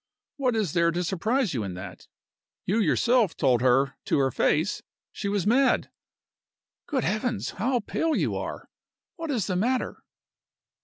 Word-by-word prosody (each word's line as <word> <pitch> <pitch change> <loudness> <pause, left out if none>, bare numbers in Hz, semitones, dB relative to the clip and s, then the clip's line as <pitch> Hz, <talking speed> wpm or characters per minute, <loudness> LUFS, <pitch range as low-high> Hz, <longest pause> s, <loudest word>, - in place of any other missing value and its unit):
What 255 -4 +1
is 210 -8 0
there 170 -1 +3
to 175 +2 -1
surprise 215 - 0
you 120 - -1
in 95 -3 -5
that? 90 - -9 0.6
You 210 +5 +1
yourself 235 -2 +2
told 125 -5 +3
her 130 +2 +3
to - - +1
her 135 -1 +2
face 160 - +1 0.3
she 200 - -4
was 200 -2 0
mad. 260 +5 +3 1.0
Good 270 -5 -1
Heavens! 215 +2 -1
how 245 +3 0
pale 320 +9 -1
you - - 0
are! - - -5 0.5
What 330 -2 -5
is 235 -10 0
the 185 - -2
matter?" 245 +7 -1
205 Hz, 155 wpm, -26 LUFS, 165-250 Hz, 1.0 s, there